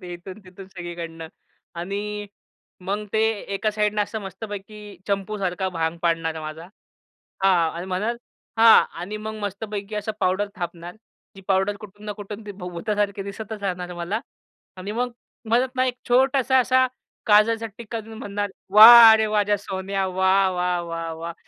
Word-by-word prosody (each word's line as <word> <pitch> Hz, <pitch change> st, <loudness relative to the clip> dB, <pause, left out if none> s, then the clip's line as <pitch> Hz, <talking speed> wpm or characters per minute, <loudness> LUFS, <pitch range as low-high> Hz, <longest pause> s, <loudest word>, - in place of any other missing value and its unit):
ते 180 Hz, -1 st, -8 dB
इथून, 185 Hz, +3 st, -9 dB
तिथून 185 Hz, +1 st, -12 dB
सगळीकडनं 170 Hz, -3 st, -7 dB, 0.5 s
आणि 205 Hz, +3 st, -4 dB, 0.6 s
मग 205 Hz, +2 st, -2 dB
ते 220 Hz, -, +2 dB, 0.3 s
एका 215 Hz, +2 st, 0 dB
साईडनं 210 Hz, 0 st, 0 dB
असं 220 Hz, +2 st, -5 dB
मस्तपैकी 205 Hz, +1 st, -8 dB, 0.3 s
चंपूसारखा 195 Hz, -2 st, -2 dB
भांग 165 Hz, -2 st, -2 dB
पाडणार 165 Hz, -1 st, 0 dB
माझा. 155 Hz, +1 st, -7 dB, 0.8 s
हां 175 Hz, -4 st, +4 dB
आणि 175 Hz, +2 st, -5 dB
म्हणल 200 Hz, +6 st, -2 dB, 0.4 s
हां, 225 Hz, 0 st, +8 dB, 0.2 s
आणि 200 Hz, +5 st, -5 dB
मग 215 Hz, +1 st, -6 dB
मस्तपैकी 205 Hz, +1 st, -5 dB
असं 210 Hz, +1 st, -3 dB
पावडर 190 Hz, +3 st, +1 dB
थापणार. 175 Hz, 0 st, -6 dB, 0.4 s
जी -, -, -10 dB
पावडर 195 Hz, +1 st, +1 dB
कुठून 205 Hz, 0 st, -12 dB
ना, 210 Hz, -, -3 dB
कुठून 205 Hz, +1 st, -9 dB
ती 205 Hz, -, -6 dB
भुतासारखी 200 Hz, +2 st, -2 dB
दिसतच 205 Hz, +1 st, -7 dB
राहणार 180 Hz, -2 st, -3 dB
मला. 175 Hz, +6 st, -3 dB, 0.6 s
आणि 190 Hz, +3 st, -6 dB
मग 245 Hz, +2 st, -1 dB, 0.4 s
म्हणत 245 Hz, +3 st, +3 dB
ना, 255 Hz, -, +3 dB
एक 250 Hz, -, -1 dB
छोटासा 260 Hz, +1 st, +3 dB
असा 255 Hz, +1 st, +4 dB, 0.4 s
काजळचा 225 Hz, +1 st, +4 dB
टीक्का 230 Hz, 0 st, -5 dB
देऊन 220 Hz, 0 st, -11 dB
म्हणणार, 205 Hz, -3 st, -3 dB, 0.2 s
"वाह 225 Hz, +1 st, +11 dB
रे 220 Hz, 0 st, +1 dB
वाह! 210 Hz, 0 st, 0 dB
माझ्या 205 Hz, 0 st, +2 dB
सोन्या, 195 Hz, 0 st, -3 dB
वाह, 190 Hz, +1 st, +3 dB
वाह, 180 Hz, -1 st, -1 dB
वाह, 165 Hz, -1 st, -5 dB
वाह! 165 Hz, +1 st, -6 dB
200 Hz, 155 wpm, -23 LUFS, 180-215 Hz, 0.8 s, वाह